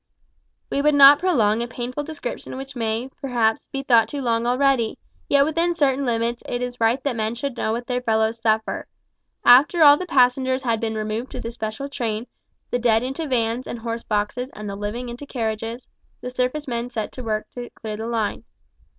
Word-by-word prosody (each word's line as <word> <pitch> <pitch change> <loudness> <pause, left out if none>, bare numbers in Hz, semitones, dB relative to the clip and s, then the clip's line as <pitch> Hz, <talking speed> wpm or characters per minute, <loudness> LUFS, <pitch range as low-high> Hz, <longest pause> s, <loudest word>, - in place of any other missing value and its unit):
We 280 - +1
would 300 0 +3
not 280 0 +9
prolong 235 - +2
a 235 - -2
painful 250 +3 -4
description 290 -4 -6
which 270 +1 -8
may, 230 +2 -2
perhaps, 235 -5 0
be 275 0 -5
thought 235 -4 +4
too 290 - -5
long 235 -2 0
already 250 -2 +2 0.3
yet 280 0 +5
within 335 +3 0
certain 275 -3 +1
limits 235 0 -1
it 245 0 -2
is 245 -1 -6
right 230 +4 +2
that 280 -4 -1
men 220 +1 -2
should 260 +1 -4
know 220 - -1
what 240 +1 -3
their 250 0 -2
fellows 220 -1 +1
suffer. 220 -1 0 0.6
After 285 +7 +7
all 290 -1 +9
the 365 - -5
passengers 260 -2 +2
had 230 -3 0
been 220 -1 -2
removed 215 +3 -3
to 255 - -5
the 230 -1 -5
special 220 +3 -5
train 230 -5 -3 0.5
the 245 - +1
dead 230 -1 +3
into 270 +5 -3
vans 240 -1 -1
and - - -5
horse 230 0 -4
boxes 215 +4 -2
and 210 0 -7
the 200 - -4
living 210 +5 -4
into 240 +4 -8
carriages 225 0 -4 0.3
the 250 - -6
surface 255 +4 -2
men 240 -1 -3
set 220 -4 -4
to 255 - -8
work 215 -1 -3
to 245 -1 -7
clear 215 -1 -6
the 220 +1 -4
line. 225 -3 -2
245 Hz, 200 wpm, -23 LUFS, 225-270 Hz, 0.6 s, not